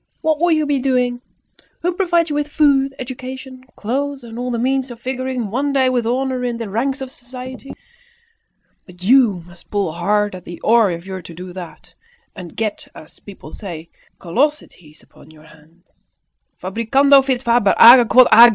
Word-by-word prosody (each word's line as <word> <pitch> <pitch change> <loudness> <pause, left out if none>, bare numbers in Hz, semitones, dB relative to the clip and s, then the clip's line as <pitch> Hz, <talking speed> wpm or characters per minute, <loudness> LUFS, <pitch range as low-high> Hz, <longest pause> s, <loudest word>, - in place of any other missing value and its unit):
What 315 -1 0
would 345 -1 +3
you 310 -1 0
be 290 -2 0
doing? 250 -2 0 0.6
Who 355 +1 0
provides 345 -3 +1
you - - -2
with 295 0 -1
food, 275 -2 +2
education, 260 0 -8
clothes, 275 +4 -3
and 230 0 -9
all 250 0 -3
the 240 - -2
means 260 +2 -1
of 240 -2 -10
figuring 255 -3 -4
one 275 +4 -1
day 260 -2 +3
with 245 -3 -1
honour 255 +1 -1
in 240 -1 -2
the 230 -3 -6
ranks 265 +7 -2
of 265 -1 -6
society? 255 +1 -10 1.1
But 180 -1 -15
you 220 -5 +3
must 175 0 -17
pull 200 -5 -1
hard 205 +5 0
at 185 -1 -9
the 175 -1 -10
oar 230 -2 +4
if 170 0 -6
you're 190 -1 -6
to 170 -1 -12
do 180 +1 -9
that, 175 -2 -11 0.4
and 175 -3 -10
get, 215 -2 -3
as, 155 - -14
people 190 -6 -13
say, 170 -5 -9 0.3
callosities 180 - -3
upon - - -20
your 155 -1 -18
hands. 160 +3 -23 0.4
Fabricando 265 +8 +3
fit 260 -2 -1
faber, 235 -4 +2
age 240 +1 +9
quod 255 -1 +7
agis." 235 +2 +9
245 Hz, 180 wpm, -18 LUFS, 195-270 Hz, 1.1 s, age